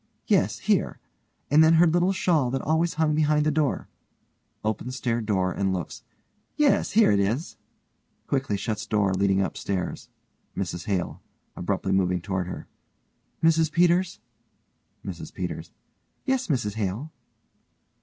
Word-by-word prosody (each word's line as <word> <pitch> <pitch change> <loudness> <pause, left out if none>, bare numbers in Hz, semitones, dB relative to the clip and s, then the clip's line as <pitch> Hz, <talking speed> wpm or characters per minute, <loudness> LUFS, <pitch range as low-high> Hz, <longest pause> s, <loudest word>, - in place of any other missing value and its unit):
Yes, - - +2
here. - - 0 0.5
And 155 +2 +7
then 160 +1 +6
her 170 +2 +6
little 175 +3 +3
shawl 165 -8 +1
that 135 +1 -2
always 160 +2 +1
hung 155 -1 +2
behind 150 0 +2
the 155 - +3
door. 150 -2 0 0.8
(opens 110 +4 -2
stair 120 -3 -1
door 95 -4 0
and 95 +2 -1
looks) 90 -4 -5 0.5
Yes, 300 -2 +2
here 220 - +5
it 100 - +3
is. 115 - -1 0.7
(Quickly 130 -7 -1
shuts 105 +2 -3
door 100 -3 +1
leading 95 0 +2
upstairs.) 95 -1 -4 0.5
MRS 85 -3 -3
HALE: 95 -4 -2 0.3
(abruptly 95 +1 -2
moving 90 -2 +2
toward 95 0 -3
her) 90 - -7 0.8
Mrs 160 -1 +4
Peters? 175 +2 +2 0.9
MRS - - -7
PETERS: - - -5 0.5
Yes, 265 -1 0
Mrs 120 - 0
Hale? 110 +8 -3
120 Hz, 135 wpm, -25 LUFS, 95-160 Hz, 0.9 s, And